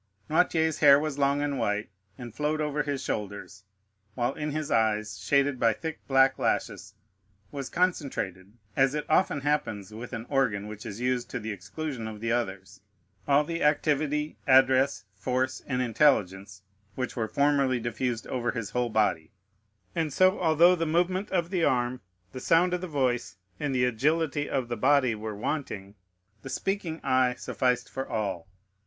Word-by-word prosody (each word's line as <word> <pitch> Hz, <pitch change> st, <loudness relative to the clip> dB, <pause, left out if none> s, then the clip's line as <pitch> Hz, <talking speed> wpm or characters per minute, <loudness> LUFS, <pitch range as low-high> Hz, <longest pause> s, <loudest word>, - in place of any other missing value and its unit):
Noirtier's 160 Hz, -1 st, +2 dB
hair 140 Hz, -2 st, +7 dB
was 150 Hz, -2 st, -3 dB
long 140 Hz, +1 st, +2 dB
and 145 Hz, -1 st, -2 dB
white, 105 Hz, +1 st, -1 dB, 0.3 s
and 120 Hz, -3 st, -8 dB
flowed 150 Hz, +1 st, -1 dB
over 150 Hz, -1 st, -1 dB
his 145 Hz, -2 st, -3 dB
shoulders; 100 Hz, 0 st, -5 dB, 0.5 s
while 120 Hz, +2 st, 0 dB
in 150 Hz, 0 st, -4 dB
his 150 Hz, 0 st, -3 dB
eyes, 110 Hz, -1 st, +1 dB
shaded 140 Hz, -2 st, +1 dB
by 115 Hz, -1 st, +4 dB
thick 160 Hz, +7 st, -6 dB
black 135 Hz, 0 st, +4 dB
lashes, -, -, -2 dB, 0.6 s
was 140 Hz, -2 st, -5 dB
concentrated, 130 Hz, -, -1 dB, 0.2 s
as 135 Hz, +2 st, +3 dB
it 150 Hz, -, -2 dB
often 155 Hz, -3 st, +2 dB
happens 110 Hz, -9 st, -2 dB
with 115 Hz, +3 st, -8 dB
an 115 Hz, -2 st, -5 dB
organ 125 Hz, -8 st, 0 dB
which 105 Hz, 0 st, -8 dB
is 105 Hz, -, -7 dB
used 125 Hz, 0 st, -1 dB
to 125 Hz, -, -4 dB
the 110 Hz, 0 st, -5 dB
exclusion 110 Hz, -, -5 dB
of 110 Hz, -1 st, -7 dB
the 115 Hz, +1 st, -2 dB
others, 100 Hz, -5 st, -3 dB, 0.5 s
all 145 Hz, +1 st, +4 dB
the 165 Hz, +2 st, -4 dB
activity, 150 Hz, 0 st, +1 dB
address, 130 Hz, -1 st, +4 dB
force, 125 Hz, +7 st, -2 dB
and 125 Hz, -2 st, 0 dB
intelligence 100 Hz, -7 st, +1 dB, 0.3 s
which 130 Hz, -1 st, -3 dB
were 110 Hz, -2 st, -1 dB
formerly 140 Hz, -1 st, +2 dB
diffused 120 Hz, 0 st, -2 dB
over 120 Hz, -3 st, -2 dB
his 115 Hz, -4 st, -4 dB
whole 125 Hz, -1 st, 0 dB
body; 95 Hz, -8 st, +1 dB, 0.6 s
and 160 Hz, -3 st, -1 dB
so 185 Hz, +6 st, +3 dB
although 170 Hz, +2 st, +5 dB
the 165 Hz, -2 st, -2 dB
movement 180 Hz, +5 st, 0 dB
of 175 Hz, -2 st, -1 dB
the 180 Hz, -4 st, 0 dB
arm, 125 Hz, -1 st, +1 dB, 0.3 s
the 130 Hz, -, -7 dB
sound 170 Hz, +6 st, +3 dB
of 180 Hz, -, -1 dB
the 185 Hz, -, -4 dB
voice, 125 Hz, -, -1 dB, 0.2 s
and 145 Hz, -3 st, -1 dB
the 125 Hz, 0 st, +3 dB
agility 145 Hz, +5 st, 0 dB
of 130 Hz, -3 st, -1 dB
the 120 Hz, -, -3 dB
body, 130 Hz, +1 st, +3 dB
were 110 Hz, 0 st, -5 dB
wanting, 105 Hz, -5 st, -4 dB, 0.5 s
the 135 Hz, -, -8 dB
speaking 180 Hz, -1 st, -2 dB
eye 130 Hz, -2 st, +2 dB
sufficed 125 Hz, 0 st, -1 dB
for 135 Hz, 0 st, -5 dB
all. 100 Hz, -6 st, -3 dB
130 Hz, 165 wpm, -27 LUFS, 110-150 Hz, 0.6 s, hair